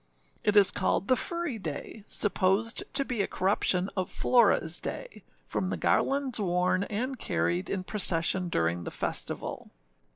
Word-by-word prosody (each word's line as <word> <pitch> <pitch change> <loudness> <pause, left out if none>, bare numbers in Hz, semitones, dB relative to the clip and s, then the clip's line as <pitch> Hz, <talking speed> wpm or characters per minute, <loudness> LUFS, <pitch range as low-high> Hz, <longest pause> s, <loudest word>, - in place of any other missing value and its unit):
It 210 0 +2
is 200 -2 +6
called 190 +1 0
the 255 - +6
Furry 340 -6 -3
day, 170 +5 -6
supposed 200 +3 +1
to 275 0 +3
be 240 -5 -1
a - - 0
corruption 185 -1 +1
of 185 -2 -2
Floraâs 205 -9 +2
day, - - -6 0.2
from - - -2
the - - -2
garlands 275 -3 +1
worn 180 0 +1
and 255 +5 -3
carried 85 +2 -1
in 190 -2 -2
procession 180 -2 +1
during 85 - 0
the - - -4
festival. - - -2
195 Hz, 150 wpm, -28 LUFS, 180-235 Hz, 0.2 s, is